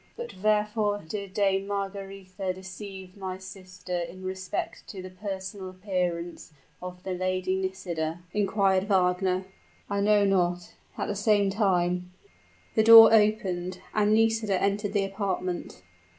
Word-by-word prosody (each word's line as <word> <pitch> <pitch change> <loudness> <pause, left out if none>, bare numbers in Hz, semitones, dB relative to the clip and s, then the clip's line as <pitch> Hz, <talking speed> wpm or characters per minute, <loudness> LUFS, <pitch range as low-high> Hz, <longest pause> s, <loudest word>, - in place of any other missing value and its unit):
"But 480 0 -6
wherefore 210 0 +1
did 200 +1 -6
Dame 195 -1 +1
Margaretha 195 -1 -4
deceive 190 0 -9
my 190 -2 -5
sister 185 -1 -8
in 175 +2 -7
respect 185 0 -4
to 195 - -8
the 185 0 -8
personal 190 0 -6
appearance 180 -3 -3 0.3
of 180 0 -8
the 190 - -4
Lady 185 0 -1
Nisida?" 175 -4 -3
inquired 195 -2 +2
Wagner. 185 -1 +1 0.5
"I 200 - 0
know 205 0 +4
not. 180 -2 0 0.2
At - - -1
the - - -2
same 205 -1 +2
time 180 -3 0 0.3
" - - -32
The 220 - +5
door 225 0 +10
opened, 190 -5 +2
and 210 0 +3
Nisida 220 -3 +2
entered 200 +1 0
the 200 -2 +2
apartment. 195 -2 -4
190 Hz, 135 wpm, -27 LUFS, 185-205 Hz, 0.5 s, door